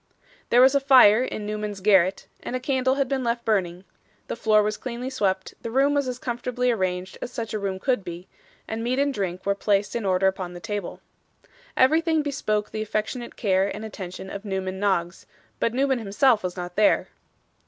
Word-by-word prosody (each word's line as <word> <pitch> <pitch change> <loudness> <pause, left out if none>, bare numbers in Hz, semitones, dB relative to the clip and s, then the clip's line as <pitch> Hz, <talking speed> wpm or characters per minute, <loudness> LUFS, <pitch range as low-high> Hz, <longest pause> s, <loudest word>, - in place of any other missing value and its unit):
There 245 - +5
was 265 +1 +6
a 280 - +4
fire 255 -5 +6
in 215 -4 -4
Newman's 210 -1 -4
garret; 190 -1 +3 0.2
and 250 - -5
a - - -1
candle 260 0 +1
had 275 -1 0
been 265 -1 -1
left 235 0 -1
burning; 185 -4 0 0.5
the - - -2
floor 215 -1 +3
was 210 +1 -1
cleanly 250 +2 -5
swept, 190 -7 -1
the 230 - -5
room 270 +4 +3
was 285 -2 +1
as 250 -1 -3
comfortably 250 -2 -1
arranged 185 -3 -2
as 245 - -5
such 230 -3 -5
a 215 - -1
room 195 -1 -2
could 250 +1 0
be, 175 0 -8 0.4
and 225 +1 -4
meat 250 +2 0
and 280 0 +1
drink 185 -4 -4
were 200 - +2
placed 200 +1 0
in 235 - -2
order 190 -1 +1
upon 190 -2 -1
the - - -7
table. 205 -1 -5 0.8
Everything 315 +3 +3
bespoke 215 -7 -2
the 215 - -4
affectionate 215 +3 -3
care 195 -3 +1
and 215 +2 -6
attention 190 -2 -8
of 200 - -6
Newman 190 -2 -3
Noggs, 190 -3 -1 0.3
but 230 - +1
Newman 265 +1 +1
himself 225 +2 +2
was 180 0 -4
not 175 0 -6
there. 210 0 +3
215 Hz, 195 wpm, -24 LUFS, 190-250 Hz, 0.8 s, was